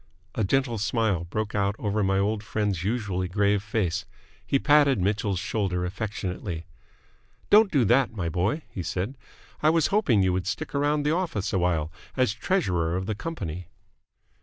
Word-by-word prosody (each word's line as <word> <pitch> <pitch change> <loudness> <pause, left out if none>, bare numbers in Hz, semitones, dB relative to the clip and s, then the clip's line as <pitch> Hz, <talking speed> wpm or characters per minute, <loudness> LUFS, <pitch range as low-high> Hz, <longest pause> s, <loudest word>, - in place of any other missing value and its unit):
A 110 - -1
gentle 120 +2 +1
smile 105 -4 0
broke 105 +4 -3
out 100 0 +1
over 105 0 -1
my 95 0 +2
old 105 +2 0
friend's 105 -5 -2
usually 100 -4 -1
grave 100 +2 +2
face. 100 -4 -1 0.4
He 140 - +1
patted 145 -4 +4
Mitchell's 100 +1 0
shoulder 90 -1 -1
affectionately. 95 -3 -4 0.9
"Don't 210 -1 +7
do 135 -7 +3
that, 125 +5 +3
my 95 -7 -3
boy," 95 - 0
he 95 - -6
said. 95 +9 -3 0.5
"I 155 - +5
was 165 0 +3
hoping 130 - +3
you 95 -1 +2
would 90 0 -2
stick 150 +11 -3
around 145 +1 +1
the 150 +2 +2
office 165 - -2
awhile 85 -4 +1 0.3
as 130 -5 +2
treasurer 90 - 0
of 95 - -3
the 110 - -1
company." 95 - -5
105 Hz, 160 wpm, -26 LUFS, 90-125 Hz, 0.9 s, Don't